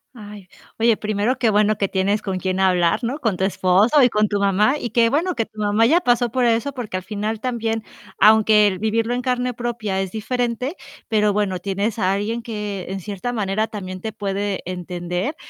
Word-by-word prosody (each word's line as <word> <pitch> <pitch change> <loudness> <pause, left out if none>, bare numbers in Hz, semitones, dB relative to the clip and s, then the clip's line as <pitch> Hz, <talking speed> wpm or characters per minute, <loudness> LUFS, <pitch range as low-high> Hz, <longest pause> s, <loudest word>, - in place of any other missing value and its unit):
Ay, 205 -3 -11 0.3
oye, 230 0 +3
primero 215 +4 -1
qué 240 -3 +3
bueno 210 0 +3
que 200 - +1
tienes 195 +2 0
con 190 -2 -3
quién 185 +1 -2
hablar, 180 +1 +2
¿no? 245 +5 -2
Con 225 -10 -1
tu 190 - 0
esposo 200 +9 +3
y 250 - +5
con 215 -1 +2
tu 205 - -1
mamá 200 +6 +3
y 240 - -5
que 230 0 +3
bueno 335 +8 0
que 225 -7 -2
tu 215 - -14
mamá 210 +2 +3
ya 335 +7 +4
pasó 245 -5 +2
por 250 +2 0
eso, 235 +4 +1
porque 235 -8 -5
al 185 - -6
final 210 +2 -3
también, 225 -2 -2 0.4
aunque 215 -1 +6
el 190 -2 -1
vivirlo 225 +3 0
en 250 - -3
carne 250 -1 -1
propia 230 -5 -3
es 190 -1 -4
diferente, 245 - -2 0.3
pero 210 -2 +2
bueno, 200 -2 0
tienes 200 +4 -2
a 190 -3 +1
alguien 220 +4 -2
que 210 -5 -5
en 195 +1 -4
cierta 205 +5 -5
manera 215 -1 0
también 185 -4 -7
te 220 +2 -5
puede 200 -1 -2
entender 180 - -4
215 Hz, 205 wpm, -21 LUFS, 195-235 Hz, 0.4 s, aunque